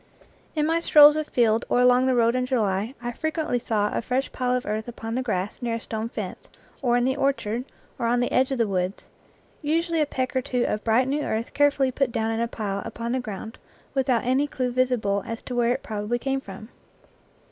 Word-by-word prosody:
In 300 -1 +1
my 325 +2 +2
strolls 300 -3 +8
afield 235 -7 +1
or - - +3
along 250 +1 +5
the 260 - +3
road 235 -1 +3
in 255 0 0
July 220 -1 0
I 240 - -2
frequently 315 -1 -1
saw 210 -3 0
a - - 0
fresh 255 +4 -1
pile 250 0 0
of 250 - -2
earth 215 +2 -3
upon 225 -1 -6
the 255 - 0
grass 205 -5 -3
near 235 -1 -1
a - - -3
stone 225 0 -4
fence, - - -6 0.3
or 245 -3 +2
in 245 - +2
the 260 0 +1
orchard, 260 -4 -1 0.3
or 235 - 0
on 240 +1 +2
the 245 - 0
edge 260 +1 +2
of 265 - 0
the 230 -2 +2
woods 185 0 -2 0.5
usually 330 +2 0
a 300 - +2
peck 260 -2 -3
or 260 - +2
two 250 -1 -1
of 210 - -2
bright, 235 +3 +3
new 290 +2 0
earth 225 -4 -3
carefully 280 -2 +3
put 265 -1 0
down 225 0 -1
in 225 - -1
a 235 - +1
pile 205 -4 -3
upon 230 +1 -5
the 260 - 0
ground 220 -1 -7 0.3
without 260 -4 +1
any 260 +4 +2
clue 255 -3 -2
visible 240 -6 +1
as 230 0 -5
to 250 - -6
where 240 -1 +2
it - - -2
prob 210 -2 -4
ably 240 +3 0
came 270 +2 -2
from. 200 0 -10
245 Hz, 225 wpm, -25 LUFS, 225-265 Hz, 0.5 s, strolls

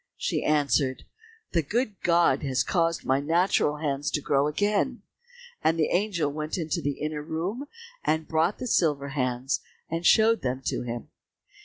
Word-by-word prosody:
She - - -1
answered, 140 -3 +1 0.5
"The 170 - +2
good 210 - -2
God 170 -5 +3
has 135 -3 0
caused 165 -2 0
my 130 +1 +2
natural 160 0 +2
hands 145 -2 -1
to - - 0
grow 140 0 +1
again;" 205 - 0 0.6
and 165 - +3
the 155 - +1
angel 175 -6 +1
went 155 +4 -3
into 160 -3 -2
the 145 -1 -2
inner 150 0 -3
room, 175 - -3 0.4
and 160 0 0
brought 160 +4 +1
the 255 - -5
silver 150 - +1
hands, 130 -1 -1 0.3
and 165 +1 -2
showed 225 +4 +5
them 130 +1 -2
to - - -1
him. 120 -1 -5
155 Hz, 160 wpm, -27 LUFS, 140-175 Hz, 0.6 s, showed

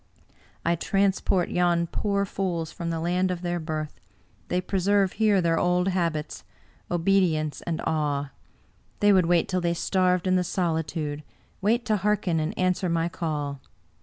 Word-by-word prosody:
I 170 +1 +3
transport 195 0 +1
yon 175 -1 +2
poor 200 +3 -1
fools 175 -5 -3
from 170 -1 -5
the 165 -1 -2
land 180 +3 +1
of 180 -1 -3
their 175 0 -1
birth; 155 -2 -5 0.5
they 180 - 0
preserve 195 +1 +1
here 210 -3 +3
their 165 -1 +2
old 180 +1 +2
habits— 170 -5 -2 0.5
obedience 170 -4 +1
and 165 -2 -1
awe. 145 -3 -1 0.7
They 205 0 +5
would 185 -3 +4
wait 175 -1 +3
till 185 -1 -1
they 170 0 0
starved 180 0 +1
in 185 0 +3
the 180 - +1
solitude 160 -4 -2 0.2
— - - -36
wait 230 +5 +1
to 215 -3 +2
hearken 195 -4 +1
and 155 0 -3
answer 185 0 +1
my 165 0 0
call. 145 -5 -3
175 Hz, 160 wpm, -26 LUFS, 165-190 Hz, 0.7 s, They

